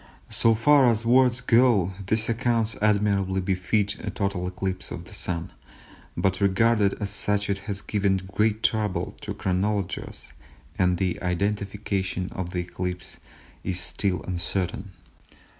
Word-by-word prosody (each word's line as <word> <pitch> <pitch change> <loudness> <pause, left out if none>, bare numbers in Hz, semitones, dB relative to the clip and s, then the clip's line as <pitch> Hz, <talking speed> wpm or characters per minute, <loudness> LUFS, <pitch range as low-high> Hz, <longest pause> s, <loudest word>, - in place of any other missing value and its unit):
So 115 -1 +4
far 135 +4 +5
as 115 0 0
words 125 +1 +4
go 115 -7 +4 0.2
these 110 +2 +2
accounts 115 -2 +1
admirably 100 -2 +2
befit 95 +3 0
a 105 - -2
total 100 -3 -2
eclipse 95 +1 -3
of 85 - -7
the 105 - -12
Sun, 85 -4 -3 0.7
but 95 +1 0
regarded 100 +1 +3
as 100 -2 -2
such 105 0 0
it 100 - -1
has 100 -1 -3
given 100 -2 +1 0.2
great 110 +1 +1
trouble 105 -3 0
to - - -5
chronologers, 95 +1 -2 0.5
and 90 -1 +3
the 90 -1 -1
identification 95 0 -2
of 90 -2 -4
the 90 0 -2
eclipse 90 0 -5 0.4
is 90 -1 -1
still 90 +1 -1
uncertain. 90 +2 -2
100 Hz, 135 wpm, -25 LUFS, 90-110 Hz, 0.7 s, far